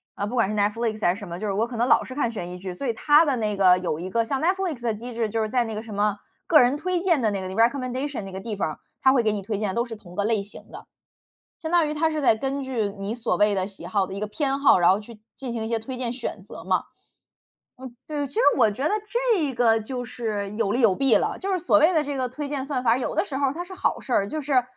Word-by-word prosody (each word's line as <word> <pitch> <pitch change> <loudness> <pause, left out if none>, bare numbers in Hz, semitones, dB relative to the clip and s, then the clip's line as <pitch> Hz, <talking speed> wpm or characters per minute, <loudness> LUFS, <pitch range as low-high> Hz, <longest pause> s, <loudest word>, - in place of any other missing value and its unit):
呃， 205 - -2
不 240 - -5
管 225 -5 +2
是 215 - -2
Netflix， 215 +1 0
还 175 - +3
是 - - -10
什 205 - -8
么。 170 0 -6
就 215 - -3
是 200 - -1
我 220 +4 0
可 240 -1 -7
能 240 +2 +1
老 - - +5
是 260 - -8
看 240 -5 0
悬 180 -5 -6
疑 180 - -7
剧， 185 -1 -6
所 265 +8 -4
以 230 - +1
它 295 +6 +5
的 280 -3 +1
那 215 -2 -1
个， 185 -2 +6
有 170 -3 -2
一 185 +2 -5
个 230 +3 +1
像 270 +3 -2
Netflix 355 -6 0
的 230 -2 0
机 240 +3 -7
制， 230 -1 -1
就 225 +1 -1
是 215 - -1
在 250 0 +2
那 225 -2 -5
个 215 - -4
什 220 -2 -9
么， 205 0 +1 0.3
个 310 - +7
人 250 +2 +3
推 360 +3 -1
荐 340 -7 +2
的 215 -2 +2
那 195 - -2
个， 185 - -5
recommendation 255 +4 0
那 195 - -8
个 190 - -6
地 210 +2 -5
方 195 - -1
儿， - - -11 0.2
它 265 - +5
会 250 -3 +3
给 215 - +2
你 210 - -2
推 205 +2 -3
荐 210 -1 -1
的 190 - -4
都 235 - +1
是 230 -2 -7
同 180 -4 -14
个 205 - 0
类 215 -1 +1
型 205 - -13
的。 - - -10 0.7
相 320 0 -5
当 340 -3 +4
于 300 - -2
它 320 +1 +1
是 310 -1 -2
在 245 - +4
根 270 +4 -3
据 240 -6 -1
你 200 +2 -3
所 235 - -1
谓 210 0 +3
的 190 -1 -1
喜 200 -1 -11
好 200 -3 0
的 190 - -8
一 195 - -5
个 210 - -2
偏 275 +4 -1
好， 275 -9 +5
然 175 0 +5
后 195 - +2
去 215 0 -13
进 255 -3 -5
行 225 -2 -3
一 - - -4
些 230 -1 0
推 255 +4 -6
荐 245 -2 -2
选 235 -5 -5
择 - - -10
嘛。 - - +1 1.0
嗯， 255 -2 -9
对， 290 -2 -3
其 275 - -12
实 - - +3 0.2
我 220 - +5
觉 210 +6 -5
得 305 - +2 0.4
这 290 -8 -1
个 225 -2 +4
就 245 +3 -5
是 210 -4 -4
有 200 -3 +1
利 245 +4 +1
有 210 -5 +5
弊 270 +2 +3
了。 - - 0
就 390 +1 -3
是 375 - +2
所 330 -3 +3
谓 325 +4 +5
的 310 - +3
这 285 -1 -4
个 255 -1 -1
推 290 +3 -5
荐 280 -2 -2
算 270 -3 -2
法 230 - +4
儿， 245 - +2
有 - - -3
的 - - +1
时 275 - -6
候 275 -2 +1
它 345 +3 -4
是 375 +1 -11
好 380 - -1
事 255 - -4
儿。 200 - +2
就 310 +7 -4
是 265 -3 +2
235 Hz, 395 characters per minute, -24 LUFS, 210-275 Hz, 1.0 s, 个